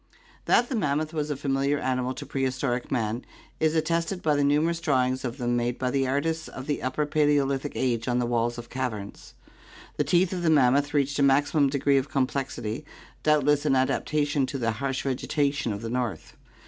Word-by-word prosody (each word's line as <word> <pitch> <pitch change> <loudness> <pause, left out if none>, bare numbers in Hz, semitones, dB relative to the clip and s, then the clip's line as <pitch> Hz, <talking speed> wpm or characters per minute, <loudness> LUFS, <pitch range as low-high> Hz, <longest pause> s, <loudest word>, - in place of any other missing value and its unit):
That 245 - +4
the 255 - -3
mammoth 155 -5 0
was 150 -1 -2
a 145 - -1
familiar 140 +1 0
animal 130 -1 -1
to 145 - -7
prehistoric 130 -2 -2
man 115 -1 -1 0.4
is 160 0 +2
atested 165 +3 0
by 150 -2 +3
the 145 - +2
numerous 155 +4 +2
drawings 130 -5 +1
of 125 0 -4
them 120 -2 0
made 120 0 -1
by 125 -1 -1
the 135 -1 +1
artists 160 +4 -1
of 130 - -8
the 145 -1 -2
Upper 130 +4 -1
Paleolithic 145 -2 +1
age 120 -2 -1
on 125 0 +1
the 125 - +1
walls 120 0 0
of 120 0 -8
caverns. 115 -6 -5 0.6
The - - +2
teeth 175 +5 +2
of 180 - -3
the 170 - +2
mammoth 140 0 +3
reached 140 0 +1
a - - +3
maximum 140 +1 +3
degree 140 0 +2
of 135 +2 -5
complexity, 130 -3 -2 0.4
doubt 150 -2 +3
less 145 0 +3
an 145 -3 +2
adaptation 145 +1 +1
to 140 - -4
the 115 -3 0
harsh 135 +3 -3
vegetation 140 -1 -1
of 100 +2 -5
the 115 - -3
north. 125 -4 -3
140 Hz, 195 wpm, -26 LUFS, 125-150 Hz, 0.6 s, That